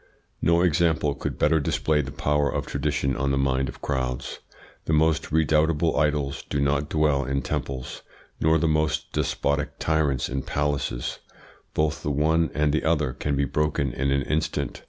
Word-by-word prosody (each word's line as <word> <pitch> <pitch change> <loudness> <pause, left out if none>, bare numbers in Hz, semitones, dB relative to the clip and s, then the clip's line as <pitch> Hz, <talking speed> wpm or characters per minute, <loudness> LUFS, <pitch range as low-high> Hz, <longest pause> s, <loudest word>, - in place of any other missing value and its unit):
No 85 +2 +3
example 80 -4 +2
could 70 - -5
better 80 +1 +3
display 75 +1 +1
the 70 - -6
power 75 0 +1
of - - -2
tradition 65 -1 -1
on 70 +2 -1
the 70 - +1
mind 65 -1 +1
of - - -11
crowds. 65 -2 -2 0.5
The 80 - 0
most 80 0 +2
redoubtable 80 +1 +2
idols 75 -1 0
do 70 - -1
not 70 +1 +1
dwell 75 -3 +2
in 70 +2 -2
temples, 65 -1 -4 0.4
nor 80 +1 +3
the 80 +1 +1
most 75 0 0
despotic 75 0 -1
tyrants 75 -5 +1
in 65 +1 -3
palaces; 70 -4 -2 0.6
both 75 0 0
the - - -2
one 80 +3 +2
and 75 -1 +2
the 80 - +1
other 75 -5 +1
can 75 -1 -2
be 70 0 +1
broken 70 -2 0
in 70 +1 -1
an 70 0 +1
instant. 75 +2 -2
75 Hz, 170 wpm, -25 LUFS, 70-80 Hz, 0.6 s, No